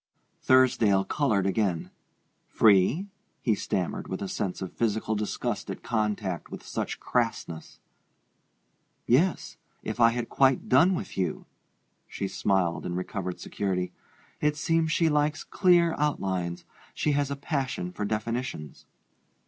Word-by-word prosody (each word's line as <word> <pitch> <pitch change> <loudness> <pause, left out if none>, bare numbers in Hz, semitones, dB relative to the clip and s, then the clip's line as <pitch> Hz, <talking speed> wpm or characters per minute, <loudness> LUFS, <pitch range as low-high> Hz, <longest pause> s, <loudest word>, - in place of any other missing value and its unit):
Thursdale 115 -7 +4
colored 110 -10 +1
again. 95 -4 0 0.6
"Free?" 110 - +4 0.3
he 115 - +1
stammered, 95 -3 -2
with 95 - -4
a - - -3
sense 95 -1 -3
of 95 -2 -6
physical 110 -1 0
disgust 105 -1 -3
at - - -6
contact 105 -5 -2
with - - -9
such - - -4
crassness. 115 -9 -2 1.3
"Yes 165 +10 +2 0.3
if 110 +2 -4
I 115 -1 +7
had 120 0 -3
quite 135 -2 +2
done 170 +9 +5
with 170 - -5
you." 90 -4 -2 0.6
She 100 - -4
smiled 95 -3 0
in 90 - -3
recovered 90 0 -4
security. 90 -3 -2 0.5
"It 150 0 +1
seems 165 0 +1
she 165 +1 +3
likes 150 0 +1
clear 175 -3 +3
outlines; 95 -11 -1 0.3
she 150 - +1
has 145 -1 +1
a 140 - -2
passion 135 - -3
for 105 - -5
definitions." 110 - -4
110 Hz, 130 wpm, -27 LUFS, 95-140 Hz, 1.3 s, I